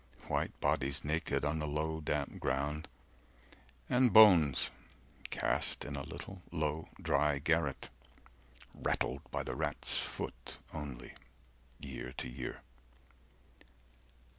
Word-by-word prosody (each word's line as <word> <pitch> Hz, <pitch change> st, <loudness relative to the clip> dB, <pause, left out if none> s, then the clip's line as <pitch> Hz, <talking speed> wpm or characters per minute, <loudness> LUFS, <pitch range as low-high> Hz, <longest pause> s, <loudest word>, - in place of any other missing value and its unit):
White -, -, -1 dB
bodies 70 Hz, +2 st, +1 dB
naked 75 Hz, -1 st, 0 dB
on 75 Hz, +2 st, 0 dB
the 75 Hz, -, -2 dB
low 80 Hz, +2 st, -1 dB
damp 75 Hz, -1 st, -2 dB
ground 75 Hz, +4 st, -1 dB, 1.0 s
And 125 Hz, -1 st, +4 dB
bones 90 Hz, -, +7 dB, 0.6 s
cast -, -, -1 dB
in 75 Hz, -, -4 dB
a 70 Hz, -, -3 dB
little 95 Hz, +6 st, -8 dB
low 80 Hz, -1 st, -1 dB
dry 75 Hz, -1 st, +2 dB
garret, 80 Hz, -1 st, 0 dB, 0.8 s
Rattled 65 Hz, +2 st, -1 dB
by -, -, -2 dB
the -, -, -4 dB
rat's -, -, +1 dB
foot -, -, -5 dB, 0.2 s
only, 70 Hz, -5 st, -6 dB, 0.7 s
year 65 Hz, -2 st, -6 dB
to 65 Hz, -, -4 dB
year. 65 Hz, 0 st, -6 dB
75 Hz, 110 wpm, -34 LUFS, 70-80 Hz, 1.0 s, bones